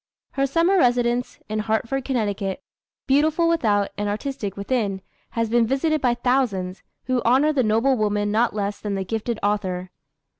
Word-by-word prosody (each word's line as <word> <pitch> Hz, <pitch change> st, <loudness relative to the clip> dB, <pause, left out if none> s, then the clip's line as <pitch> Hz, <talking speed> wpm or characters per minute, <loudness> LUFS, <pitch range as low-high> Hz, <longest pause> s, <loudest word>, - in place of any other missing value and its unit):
Her 275 Hz, 0 st, 0 dB
summer 340 Hz, +7 st, +3 dB
residence 245 Hz, -2 st, +1 dB
in 215 Hz, 0 st, -2 dB
Hartford, 225 Hz, +5 st, -1 dB
Conn., 220 Hz, -7 st, 0 dB, 0.7 s
beautiful 310 Hz, +5 st, +3 dB
without, 215 Hz, -12 st, +1 dB
and 205 Hz, 0 st, -1 dB
artistic 210 Hz, -2 st, -4 dB
within, 200 Hz, -3 st, -1 dB, 0.3 s
has 230 Hz, 0 st, +2 dB
been 230 Hz, 0 st, +2 dB
visited 305 Hz, +4 st, +1 dB
by 245 Hz, -2 st, +2 dB
thousands, 240 Hz, -7 st, 0 dB, 0.2 s
who 255 Hz, -1 st, 0 dB
honor 270 Hz, +6 st, +4 dB
the 275 Hz, -, +2 dB
noble 230 Hz, +4 st, +2 dB
woman 205 Hz, -2 st, 0 dB
not 225 Hz, +1 st, +1 dB
less 205 Hz, -1 st, -2 dB
than 205 Hz, -2 st, -3 dB
the 190 Hz, -1 st, -3 dB
gifted 225 Hz, +3 st, -2 dB
author. 185 Hz, -3 st, -1 dB
230 Hz, 155 wpm, -23 LUFS, 205-265 Hz, 0.7 s, honor